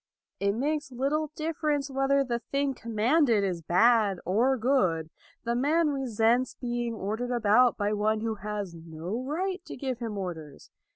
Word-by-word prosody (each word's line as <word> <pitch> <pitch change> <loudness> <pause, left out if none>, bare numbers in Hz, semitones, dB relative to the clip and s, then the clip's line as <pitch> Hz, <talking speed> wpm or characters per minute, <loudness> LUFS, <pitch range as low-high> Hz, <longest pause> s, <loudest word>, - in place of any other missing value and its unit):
It 200 0 +1
makes 290 +2 -1
little 285 +5 -1
difference 305 -3 -1
whether 270 +1 +2
the 240 -3 -2
thing 275 +2 -1
commanded 230 0 +2
is 180 -3 -2
bad 200 +3 +3
or 240 +9 +2
good. 185 - +1 0.3
The 235 - -1
man 300 +6 +2
resents 245 -2 +1
being 240 -1 -3
ordered 220 +4 -3
about 240 0 +4
by 205 0 0
one 215 +1 +1
who 225 0 -1
has 205 -3 -5
no 165 +6 -6
right 360 +6 -2
to - - -8
give 260 -2 -3
him 225 -4 -4
orders. 160 -7 -7
235 Hz, 155 wpm, -28 LUFS, 205-275 Hz, 0.3 s, about